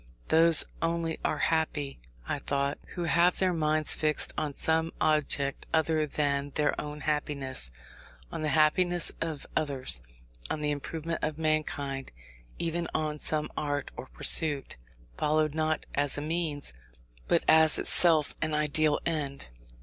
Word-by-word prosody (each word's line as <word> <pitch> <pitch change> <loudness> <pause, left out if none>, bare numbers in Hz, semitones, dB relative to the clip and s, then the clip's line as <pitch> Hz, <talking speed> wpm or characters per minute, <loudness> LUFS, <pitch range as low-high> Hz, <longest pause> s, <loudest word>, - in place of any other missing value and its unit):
Those 165 0 +7 0.2
only 165 -1 -2
are - - -1
happy 155 -3 -1 0.3
(I - - -2
thought) 140 0 -2 0.2
who 175 - -3
have 170 +1 +3
their 185 -1 +1
minds 155 -1 +2
fixed 155 -1 +1
on 150 - -2
some 160 +3 0
object 145 -2 0
other 160 -1 +1
than 140 -1 -1
their 150 -1 +1
own 150 0 -8
happiness; 140 - -1 0.6
on - - -5
the 155 - -1
happiness 170 +4 +3
of 160 -4 -4
others, 130 - +3 0.5
on 155 - -3
the 150 0 0
improvement 160 +3 -4
of 155 0 -2
mankind, 145 -4 -2 0.5
even 170 0 -2
on 150 -1 -2
some 150 0 +1
art 145 -1 -3
or - - -8
pursuit, 140 - +2 0.4
followed 155 0 +1
not 155 0 -1
as 145 0 +1
a - - -3
means, 155 - -3 0.5
but - - +2
as 160 -1 +6
itself 160 -4 +3
an 155 -1 -1
ideal 150 0 +2
end. 140 - -3
155 Hz, 140 wpm, -28 LUFS, 145-160 Hz, 0.6 s, Those